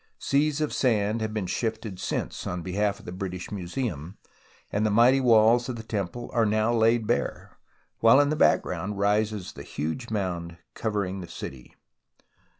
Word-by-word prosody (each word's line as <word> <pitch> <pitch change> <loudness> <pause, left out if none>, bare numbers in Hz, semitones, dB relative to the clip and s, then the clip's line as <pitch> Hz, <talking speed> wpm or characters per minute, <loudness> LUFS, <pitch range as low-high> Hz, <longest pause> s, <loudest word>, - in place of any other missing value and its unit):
Seas 150 +2 +1
of 150 - -1
sand 110 -3 +1
have 110 0 -2
been 105 -3 -2
shifted 110 0 -3
since - - -3
on 90 -1 -3
behalf 100 +3 0
of - - -16
the - - -6
British 90 -1 -5
Museum, 95 - -4 0.5
and 105 - 0
the 110 - +2
mighty 120 +5 +5
walls 120 0 +5
of 125 - -3
the 110 - -7
temple 110 +2 -4
are 115 -1 +3
now 110 +2 +2
laid 115 0 +3
bare, - - -2 0.4
while 115 +4 +6
in 145 0 +4
the 155 - +1
background 105 -8 +1
rises 105 -1 0
the - - -9
huge 80 - -4
mound 90 -5 -3 0.2
covering 100 -4 -2
the 85 - -8
city. 65 -5 -9
110 Hz, 165 wpm, -26 LUFS, 95-115 Hz, 0.5 s, while